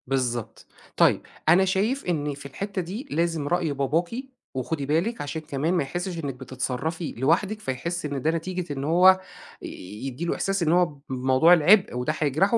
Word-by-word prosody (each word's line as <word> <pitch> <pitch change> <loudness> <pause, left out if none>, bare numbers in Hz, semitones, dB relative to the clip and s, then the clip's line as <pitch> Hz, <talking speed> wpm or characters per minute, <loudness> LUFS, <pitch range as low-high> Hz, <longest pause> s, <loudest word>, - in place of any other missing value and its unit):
بالضبط. 125 -4 -2 0.3
طيب، - - +4 0.3
أنا 185 +4 +6
شايف 205 +9 0
إن 150 -5 -1
في 140 0 -11
الحتّة 195 +8 -4
دي 200 - -6
لازم 165 -2 0
رأي 170 -2 0
باباكِ 145 +5 0 0.4
وخدي 140 +3 -2
بالِك 170 - 0
عشان 145 +2 -4
كمان 155 +2 -1
ما 175 - +2
يحسّش 175 +4 -4
إنِّك 140 -1 -2
بتتصرّفي 130 +6 -3
لوحدِك، 180 - +1
فيحِس 170 +2 -3
إن 140 -2 -3
ده 155 - +2
نتيجة 170 -1 -3
إن 135 -1 -4
هو 180 +5 +6 0.4
ي - - -6 0.4
يدّي 135 +6 -4
له - - 0
إحساس 195 -2 0
إن 160 - +2
هو 180 +1 +5 0.2
بموضوع 130 +5 +4
العِبء 180 +1 +5
وده 125 +5 -1
هيجرحه 155 - +2
160 Hz, 170 wpm, -25 LUFS, 140-180 Hz, 0.4 s, أنا